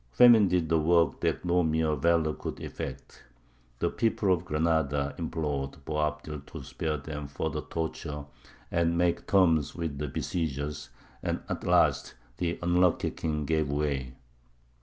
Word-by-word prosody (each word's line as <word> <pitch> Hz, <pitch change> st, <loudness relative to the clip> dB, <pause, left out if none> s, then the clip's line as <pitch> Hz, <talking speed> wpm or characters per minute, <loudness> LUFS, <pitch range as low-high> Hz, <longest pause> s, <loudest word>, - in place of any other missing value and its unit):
Famine 115 Hz, -, +7 dB
did 90 Hz, -3 st, +1 dB
the 80 Hz, 0 st, +3 dB
work 80 Hz, -2 st, +3 dB
that -, -, 0 dB
no 90 Hz, 0 st, +3 dB
mere 80 Hz, -1 st, +1 dB
valour 80 Hz, +1 st, +2 dB
could -, -, -6 dB
effect. -, -, -7 dB, 0.6 s
The -, -, 0 dB
people 105 Hz, -4 st, +2 dB
of 90 Hz, 0 st, -2 dB
Granada 75 Hz, -3 st, +1 dB
implored 75 Hz, -4 st, -3 dB
Boabdil 75 Hz, -1 st, -2 dB
to -, -, -8 dB
spare 80 Hz, -2 st, -3 dB
them 75 Hz, 0 st, -6 dB
further 70 Hz, -, -3 dB
torture 75 Hz, -2 st, -4 dB, 0.5 s
and 85 Hz, 0 st, +1 dB
make 85 Hz, 0 st, +1 dB
terms 85 Hz, -7 st, +3 dB
with 80 Hz, -5 st, -4 dB
the 75 Hz, -, -2 dB
besiegers, 75 Hz, -1 st, -3 dB, 0.3 s
and -, -, -2 dB
at -, -, -4 dB
last -, -, +3 dB, 0.2 s
the 85 Hz, -1 st, -1 dB
unlucky 90 Hz, 0 st, +2 dB
king 75 Hz, -2 st, -2 dB
gave 80 Hz, -1 st, +1 dB
way. 70 Hz, -3 st, -1 dB
80 Hz, 140 wpm, -29 LUFS, 75-85 Hz, 0.6 s, Famine